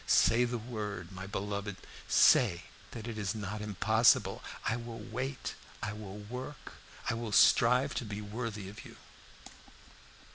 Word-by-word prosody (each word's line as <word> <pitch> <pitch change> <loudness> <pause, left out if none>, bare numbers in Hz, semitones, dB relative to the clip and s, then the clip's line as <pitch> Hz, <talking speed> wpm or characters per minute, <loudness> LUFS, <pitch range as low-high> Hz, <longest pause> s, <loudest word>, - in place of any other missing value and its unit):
Say 120 +2 +5
the 120 0 -2
word, 105 -6 -5
my 95 0 -7
beloved, 100 0 -3 0.3
say 85 +1 +5 0.3
that 115 -1 -7
it 110 -2 -4
is 100 0 -1
not 105 0 -4
impossible! 105 -5 +3 0.2
I 110 - +1
will 120 -1 -6
wait 125 +5 -4 0.3
I 105 - -2
will 105 -2 -8
work 125 +7 -8 0.3
I - - +2
will 115 -1 -4
strive 125 +6 +5
to - - -5
be 105 -2 -5
worthy 105 -1 -5
of 105 +3 -9
you." - - -12
110 Hz, 145 wpm, -32 LUFS, 100-120 Hz, 0.3 s, Say